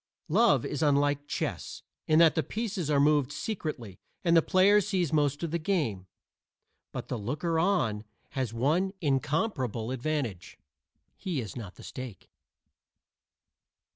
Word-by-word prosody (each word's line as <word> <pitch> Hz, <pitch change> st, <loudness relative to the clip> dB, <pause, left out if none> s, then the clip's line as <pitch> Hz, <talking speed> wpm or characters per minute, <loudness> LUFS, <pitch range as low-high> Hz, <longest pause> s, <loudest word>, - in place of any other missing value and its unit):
Love 195 Hz, -, +4 dB
is 145 Hz, -, -3 dB
unlike 145 Hz, -1 st, +2 dB
chess, -, -, -4 dB, 0.2 s
in 155 Hz, -, +4 dB
that 165 Hz, -1 st, +7 dB
the 160 Hz, -, +1 dB
pieces 210 Hz, -5 st, -3 dB
are 145 Hz, -2 st, +3 dB
moved 145 Hz, -2 st, +3 dB
secretly 150 Hz, -, -5 dB, 0.2 s
and 170 Hz, -2 st, +4 dB
the 165 Hz, -, +7 dB
player 195 Hz, +5 st, +5 dB
sees 185 Hz, -6 st, -1 dB
most 145 Hz, 0 st, +1 dB
of 165 Hz, -, -2 dB
the 170 Hz, -, 0 dB
game. 145 Hz, -, -1 dB, 0.8 s
But -, -, -6 dB
the 125 Hz, -, -3 dB
looker 155 Hz, -, -1 dB
on 145 Hz, -, +1 dB, 0.3 s
has 130 Hz, -5 st, -2 dB
one 155 Hz, +11 st, +1 dB
incomparable 135 Hz, -, -1 dB
advantage: 130 Hz, -, -3 dB, 0.6 s
he 175 Hz, -7 st, -3 dB
is 110 Hz, -6 st, -6 dB
not 105 Hz, -7 st, -7 dB
the -, -, -13 dB
stake. 125 Hz, -7 st, -8 dB
150 Hz, 140 wpm, -29 LUFS, 125-170 Hz, 0.8 s, that